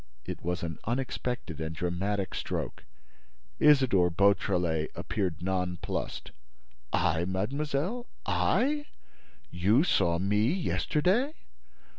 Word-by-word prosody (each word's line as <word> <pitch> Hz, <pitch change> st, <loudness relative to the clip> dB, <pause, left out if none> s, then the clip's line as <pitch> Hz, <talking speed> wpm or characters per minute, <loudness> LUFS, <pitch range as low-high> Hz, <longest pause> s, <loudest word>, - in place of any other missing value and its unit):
It -, -, -5 dB
was 90 Hz, 0 st, -2 dB
an 80 Hz, -2 st, -4 dB
unexpected 125 Hz, -, -3 dB
and 80 Hz, 0 st, -3 dB
dramatic 95 Hz, +4 st, -1 dB
stroke. -, -, -4 dB, 0.7 s
Isidore 130 Hz, -12 st, +5 dB
Beautrelet 90 Hz, -3 st, +2 dB
appeared 90 Hz, -6 st, -2 dB
nonplussed: 90 Hz, -2 st, -2 dB, 0.6 s
"I, 85 Hz, -2 st, +2 dB
mademoiselle? 140 Hz, -, -2 dB, 0.2 s
I? 290 Hz, +2 st, +1 dB, 0.6 s
You 100 Hz, -, +3 dB
saw 85 Hz, -, +2 dB
me 105 Hz, +6 st, +2 dB
yesterday?" 190 Hz, -, +1 dB
100 Hz, 90 wpm, -29 LUFS, 90-140 Hz, 0.7 s, Isidore